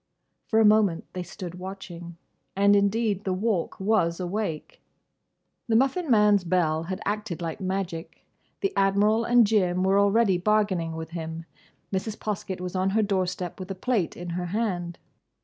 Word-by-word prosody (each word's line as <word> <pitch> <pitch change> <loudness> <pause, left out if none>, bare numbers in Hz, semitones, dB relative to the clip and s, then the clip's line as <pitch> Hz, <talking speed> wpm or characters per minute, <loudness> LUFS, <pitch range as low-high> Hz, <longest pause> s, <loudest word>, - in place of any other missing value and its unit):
For 220 - +2
a 220 - +5
moment 210 -5 +3
they 185 - -4
stood 180 0 -8
watching. 175 -3 -8 0.4
And 200 +1 +5
indeed 205 0 +1
the 190 -1 -1
Walk 195 -3 -1
was 190 -4 +1
awake. 180 -3 -4 0.9
The 225 - +2
Muffin 275 +7 +2
man's 210 -4 +5
bell 165 -3 +1
had 185 +2 -4
acted 210 -4 -3
like 165 +1 -5
magic. 185 -3 -4 0.4
The 195 - 0
Admiral 205 +3 +3
and 240 -1 +5
Jim 185 -4 +2
were 195 +1 +3
already 200 -2 +3
bargaining 190 -5 +1
with 160 0 -6
him. 165 -1 -6 0.5
Mrs. 205 +3 -2
Poskett 195 -3 -4
was 180 0 -5
on 185 +1 +1
her 220 - +4
doorstep 185 -3 -2
with 185 0 -7
a 195 - -4
plate 200 -4 -1
in 175 0 -6
her 175 +1 -3
hand. 175 -4 -2
190 Hz, 160 wpm, -26 LUFS, 175-210 Hz, 0.9 s, a